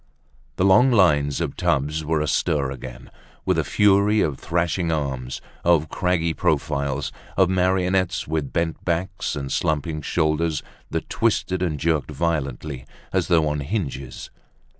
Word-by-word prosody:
The 95 - +1
long 110 +7 +6
lines 75 - +3
of - - -2
tubs 75 +3 0
were 80 0 0
astir 75 -2 0
again 65 -2 -9 0.3
with - - +2
the - - +2
fury 105 +1 +3
of 70 -4 -1
thrashing 85 0 0
arms, 65 -5 -3 0.2
of 85 -3 +3
craggy 90 -3 0
profiles, 70 -2 -1 0.3
of 95 -1 +4
marionettes 95 0 +1
with 75 -3 -2
bent 85 -1 -1
backs 95 +3 -2
and 70 -2 -4
slumping 75 0 -1
shoulders 75 +1 0 0.3
that - - -3
twisted 100 -5 0
and 80 -5 -1
jerked 80 -2 0
violently 75 -4 -2 0.3
as - - +1
though 80 -3 +3
on 75 0 -1
hinges. 70 - -4
80 Hz, 140 wpm, -23 LUFS, 75-90 Hz, 0.3 s, long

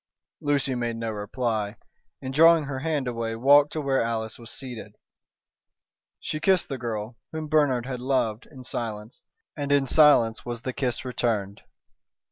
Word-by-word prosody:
Lucy 140 -2 0
made 120 -2 -2
no 115 0 -3
reply, 110 0 -2 0.5
and, 130 0 -4
drawing 165 +2 +6
her 140 -2 -4
hand 145 -2 -1
away, 115 -2 -3
walked 145 +5 +5
to 155 - -3
where 135 -2 +1
Alice 115 -1 -3
was 115 -1 -11
seated. 125 -4 -8 1.2
She 155 - -4
kissed 190 +1 +2
the 135 -2 -4
girl, 115 -1 -4
whom 160 -1 -5
Bernard 145 -6 +2
had 130 -1 -4
loved, 125 -4 -1
in 130 -4 -12
silence; 110 -2 -6 0.3
and 145 -2 -3
in 140 -1 +4
silence 135 -6 +5
was 120 -1 -6
the 130 - -3
kiss 130 -2 -2
returned. 110 -5 -2
125 Hz, 155 wpm, -26 LUFS, 115-145 Hz, 1.2 s, drawing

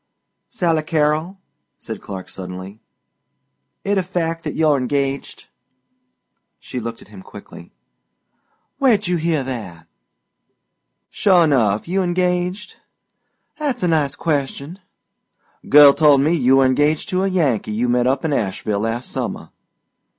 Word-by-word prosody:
"Sally 170 -9 0
Carrol," 155 +3 0 0.4
said - - -8
Clark 95 -2 -8
suddenly, 95 +3 -9 1.0
"it 200 0 +1
a - - +2
fact 165 -2 -3
that - - -5
you're 155 -2 +3
engaged?" 135 +1 -3 1.1
She 125 - -7
looked 115 0 -7
at - - -21
him 100 -2 -12
quickly. - - -13 1.1
"Where'd 230 -7 +3
you 180 0 0
hear 160 -3 0
that?" 105 -11 -7 1.3
"Sure 185 -4 +4
enough, 115 -9 +1
you 190 +3 0
engaged?" 180 +1 -1 0.8
"'At's 285 -9 -2
a - - +2
nice 155 -4 +1
question!" 145 +2 -3 0.9
"Girl 145 0 +8
told 145 -2 +4
me 155 +4 +2
you 135 -4 +3
were 135 - +5
engaged 145 +4 +1
to 185 0 0
a - - +1
Yankee 150 - 0
you 115 +4 -1
met 125 0 +1
up 135 +4 0
in 155 - 0
Asheville 100 -2 -2
last 115 +3 -3
summer." - - -5
145 Hz, 130 wpm, -20 LUFS, 125-175 Hz, 1.3 s, Girl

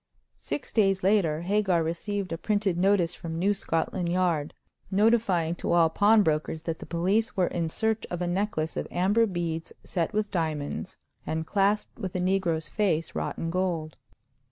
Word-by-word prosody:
Six 280 - -5
days 195 -4 +3
later 185 -6 +2
Hagar 190 -2 +2
received 185 +4 -3
a 165 - -2
printed 205 -3 0
notice 180 -1 +2
from 165 -1 -6
New 195 +4 +2
Scotland 170 -1 -1
Yard, 170 -5 0 0.3
notifying 195 -5 +2
to - - -1
all 165 -2 +4
pawn 210 +4 +5
brokers 155 -1 -1
that 165 -1 -3
the - - -9
police 195 +7 0
were 185 - +4
in 170 -2 -2
search 220 +5 -1
of 175 - -3
a 180 - -1
necklace 175 -3 -1
of - - -3
amber 205 +6 +2
beads 170 -3 -3
set 170 -4 -1
with 210 0 -1
diamonds, 155 -5 -3 0.3
and 160 0 -3
clasped 205 +5 0
with 190 -3 -5
a - - 0
negro's 180 -3 0
face 170 -7 0
wrought - - -3
in 165 - -3
gold. 170 -4 -1
180 Hz, 170 wpm, -27 LUFS, 165-205 Hz, 0.3 s, pawn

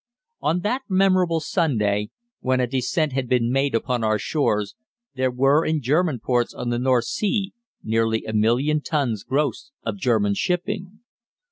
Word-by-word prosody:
On 165 +4 0
that 245 +7 -1
memorable 185 -3 +3
Sunday, 115 - 0 0.3
when 130 0 +1
a 125 - +2
descent 135 +5 0
had 130 -2 -2
been 120 -2 +2
made 135 -1 +1
upon 120 0 -1
our 110 0 +2
shores, 105 -6 0 0.4
there 130 -1 0
were 135 +5 +3
in 155 -1 0
German 150 +1 +1
ports 120 +1 0
on 120 - -4
the 120 0 0
North 125 -2 +2
Sea 200 - -1 0.3
nearly 110 0 0
a 110 - -4
million 125 +8 +2
tons 130 -10 -1
gross 145 - -1 0.2
of - - -3
German 110 - +2
shipping. 190 - -2
130 Hz, 155 wpm, -23 LUFS, 115-165 Hz, 0.4 s, memorable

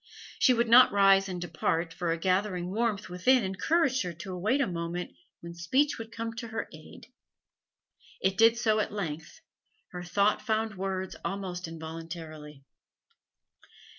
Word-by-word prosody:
She 260 -3 +5
would 235 0 +1
not 245 +3 +8
rise 195 -1 +4
and 180 -1 -4
depart, 165 0 -2
for 170 -1 -2
a 165 - 0
gathering 185 0 0
warmth 215 -2 -1
within 215 +8 +3
encouraged 260 - +1
her 180 -2 -3
to 185 +4 -8
await 215 +10 0
a 280 - +3
moment 175 -1 -4 0.3
when 170 0 -8
speech 260 - +1
would 225 0 -8
come 230 0 -5
to 230 0 -5
her 225 0 -4
aid. 155 +6 -13 1.1
It 190 0 +1
did 225 +2 +5
so 220 -2 +2
at 215 - -1
length; 165 -6 -6 0.5
her 180 - -6
thought 200 +4 +1
found 220 0 -1
words 190 -1 -4
almost 185 -3 -4
involuntarily. 160 -2 -8
190 Hz, 150 wpm, -29 LUFS, 170-225 Hz, 1.1 s, not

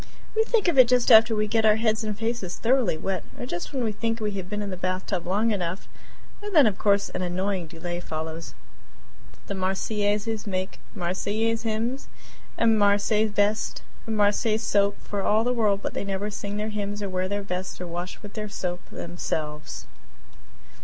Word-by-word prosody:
We 445 - +4
think 450 -4 +2
of 335 -6 +3
it 255 - +9
just 250 0 +4
after 225 0 +8
we 215 0 +1
get 220 +1 +1
our 215 -1 +6
heads 220 0 +1
and 210 -2 -3
faces 225 -5 -2
thoroughly 245 -7 +2
wet 190 +2 -2 0.2
or - - -3
just 175 -8 -5
when 265 -4 -1
we 220 - +1
think 225 +2 -2
we 210 -1 -1
have 190 -2 -5
been 210 0 -2
in 200 - -4
the - - -3
bathtub 185 0 -2
long 210 +5 +2
enough, 185 -2 -2 0.5
and 415 -2 -5
then, 295 -4 +8
of 205 -3 +1
course, 200 -1 +3
an - - -4
annoying 185 0 -1
delay 175 +2 -5
follows. 160 0 -5 0.9
These 200 - -4
Marseillaises 205 +3 -1
make 185 -1 -3 0.2
Marseillaise 210 +5 0
hymns 230 +4 -2 0.5
and 225 -1 +4
Marseilles 205 +2 +3
vests 205 +2 0 0.2
and 220 -1 -1
Marseilles 215 +2 +2
soap 200 -2 +2
for 205 -1 -3
all 215 +3 +3
the 250 +1 +1
world, 210 -4 +1
but - - -3
they - - -2
never 200 +1 -2
sing 205 0 -4
their 215 +1 -2
hymns 205 -1 -3
or 200 - -2
wear 185 0 -1
their 205 0 -2
vests 185 -1 -4
or 180 - -4
wash 175 +1 -5
with 205 - -9
their 210 -1 -4
soap 180 -3 -4
themselves. 155 -3 -4
205 Hz, 190 wpm, -26 LUFS, 185-220 Hz, 0.9 s, it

